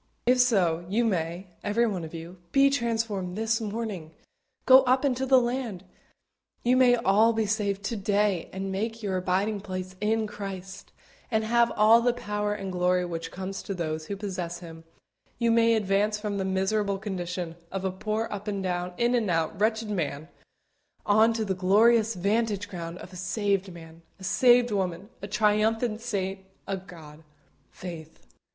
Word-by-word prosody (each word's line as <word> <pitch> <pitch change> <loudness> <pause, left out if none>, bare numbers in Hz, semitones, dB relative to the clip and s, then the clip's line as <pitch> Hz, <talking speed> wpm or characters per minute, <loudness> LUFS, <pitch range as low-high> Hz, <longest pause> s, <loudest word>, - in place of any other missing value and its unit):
If 250 +1 +4
so, 185 -9 +3
you 230 +4 +1
may, 175 -2 -1 0.2
everyone 210 -4 0
of 160 - -7
you, 170 +2 -9
be 275 0 +5
transformed 225 -7 -1
this 225 +1 0
morning 210 -7 -5 0.5
go 260 +1 +9
up 255 +3 +3
into 265 -1 0
the 260 0 +6
land. 240 -6 -3 0.8
You 245 +1 +3
may 255 -1 +6
all 225 0 +3
be 220 -1 0
saved 200 -1 -1
to 230 - -2
day, 205 -3 0
and 190 0 -4
make 225 +3 -3
your 190 -2 -1
abiding 195 +3 0
place 185 -2 -6
in 220 +1 +1
Christ, 195 -2 -8 0.4
and 220 -2 +1
have 235 +1 +3
all 220 +2 +6
the 245 0 +2
power 210 -3 -2
and 195 -2 -4
glory 180 0 +1
which 165 -1 -5
comes 190 +1 -6
to 195 - -5
those 155 -2 -3
who 200 - -3
possess 180 -4 -4
Him; 165 -2 -11 0.5
you 235 -1 +2
may 230 0 +4
advance 210 0 +1
from 210 -2 -3
the 190 - -1
miserable 195 +1 0
condition 180 -4 -4 0.2
of 195 0 -3
a 190 - 0
poor 215 +4 -2
up 205 +1 -6
and 200 -2 -2
down, 180 -1 -2
in 240 +1 +2
and 230 -5 +1
out, 165 0 0
wretched 220 0 +1
man, 155 -4 -3 0.8
on 215 +2 +5
to 225 -1 -2
the 195 - 0
glorious 215 +4 +4
vantage 205 +2 0
ground 170 -1 -6
of 185 - -11
a - - -9
saved 195 +1 -1
man 165 -1 -12 0.2
a - - -12
saved 245 +4 +4
woman 190 -1 -2
a 200 - -5
triumphant 215 +2 +1
saint 195 -5 -2 0.3
of 190 -1 -5
God! 160 -3 -12 0.5
FAITH. 165 -3 -9
200 Hz, 170 wpm, -27 LUFS, 185-225 Hz, 0.8 s, go